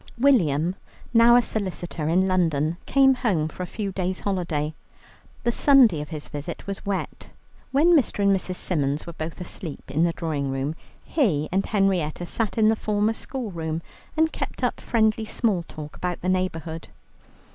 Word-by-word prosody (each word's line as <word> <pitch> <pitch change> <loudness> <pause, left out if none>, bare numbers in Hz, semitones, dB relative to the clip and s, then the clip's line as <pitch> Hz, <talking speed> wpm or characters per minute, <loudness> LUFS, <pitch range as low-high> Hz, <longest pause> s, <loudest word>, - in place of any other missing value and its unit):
William, 180 - +3 0.4
now 235 +1 +7
a 245 - +5
solicitor 175 -7 -3
in 185 +3 +3
London, 165 -4 +1
came 270 0 +5
home 205 - 0
for 160 - -9
a 180 - -3
few 205 0 -4
days' 185 0 -2
holiday. 170 -6 -1 0.7
The 235 - +2
Sunday 240 - +5
of 150 - -7
his 155 -3 -6
visit 150 +4 -6
was 195 -1 -5
wet. 200 -1 -4 0.4
When 325 +6 +5
Mr. 240 -8 +2
and 200 0 +5
Mrs. 185 -1 -3
Symons 145 -5 -1
were 170 - -7
both 160 +1 -6
asleep 175 -3 -7
in 155 +4 +2
the 170 - +3
drawing 150 -5 -2
room, 135 +3 -2 0.3
he 180 - +1
and 190 +2 +2
Henrietta 185 -6 +1
sat 220 +4 -2
in 215 -1 +5
the 220 - +3
former 210 0 0
school 245 -1 -5
room, 160 -1 -3 0.3
and 320 0 +3
kept - - -5
up - - 0
friendly 220 -1 +1
small 215 -5 0
talk 150 -1 -9
about 180 -1 -3
the 185 - -1
neighbourhood. 165 -3 -2
185 Hz, 170 wpm, -24 LUFS, 160-220 Hz, 0.7 s, now